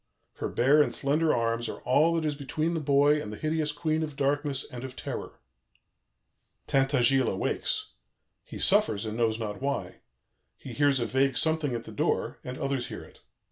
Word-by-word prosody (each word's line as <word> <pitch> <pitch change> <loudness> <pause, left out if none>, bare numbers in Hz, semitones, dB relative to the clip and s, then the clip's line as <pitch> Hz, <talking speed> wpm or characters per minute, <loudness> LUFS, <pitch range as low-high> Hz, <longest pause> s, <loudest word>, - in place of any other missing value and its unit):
Her - - -3
bare 140 +5 +4
and - - 0
slender 150 +3 +1
arms 115 0 0
are - - -7
all 155 +6 +3
that 165 -1 -1
is 150 - 0
between 155 +4 -2
the 165 - -1
boy 145 +1 +3
and 105 - -6
the 105 - -7
hideous 155 +1 -1
Queen 155 +1 -1
of 150 -3 -4
Darkness 140 0 0
and 125 0 -8
of 130 -1 -7
Terror. - - -6 1.3
"Tintagiles 135 -1 +3
awakes. 95 - -2 0.5
He - - -9
suffers 105 0 +3
and 110 0 -4
knows 115 -1 +1
not 105 -1 -5
why. 140 +1 -3 0.6
He - - -9
hears 145 -2 +3
a 120 - 0
vague 130 +2 +1
something 160 -2 +1
at 115 - -4
the - - -10
door, - - -1
and 125 +1 -6
others 135 -3 -2
hear - - -7
it. - - -17
140 Hz, 180 wpm, -28 LUFS, 125-150 Hz, 1.3 s, bare